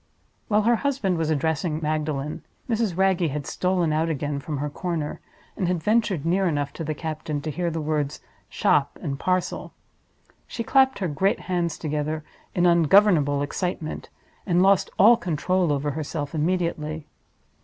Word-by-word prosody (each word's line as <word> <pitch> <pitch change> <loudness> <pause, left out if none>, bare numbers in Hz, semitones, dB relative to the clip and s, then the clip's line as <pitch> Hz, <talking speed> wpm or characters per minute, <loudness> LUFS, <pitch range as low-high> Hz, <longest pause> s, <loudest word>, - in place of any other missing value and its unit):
While 210 -1 +3
her 235 +1 +4
husband 220 -10 0
was 160 -1 0
addressing 155 +1 0
Magdalen, 150 -2 -2 0.2
Mrs. 225 -6 0
Wragge 190 -3 +2
had 145 0 -4
stolen 180 -3 0
out 160 +2 +1
again 145 -2 -2
from 145 +1 -4
her 145 +2 -2
corner, 155 0 -3 0.4
and 185 - -1
had 175 -3 -1
ventured 210 -7 +1
near 185 +3 +2
enough 145 -3 -1
to 165 - -5
the 155 0 -3
captain 155 -1 -4
to 155 - -3
hear 175 +3 -1
the 165 0 -3
words 150 -1 -1 0.3
"shop" 140 0 +1
and 140 -5 -4
"parcel." 185 -1 -1 0.7
She 230 - -4
clapped 265 +2 +4
her 190 - -1
great 190 +6 0
hands 175 -3 -1
together 155 0 -2 0.3
in 175 - +3
ungovernable 170 -4 +4
excitement, 160 +1 -4 0.4
and 175 0 +3
lost 195 -1 +4
all 230 +4 +7
control 180 -3 0
over 145 0 0
herself 145 0 -4
immediately. 160 -2 -1
165 Hz, 155 wpm, -24 LUFS, 150-185 Hz, 0.7 s, all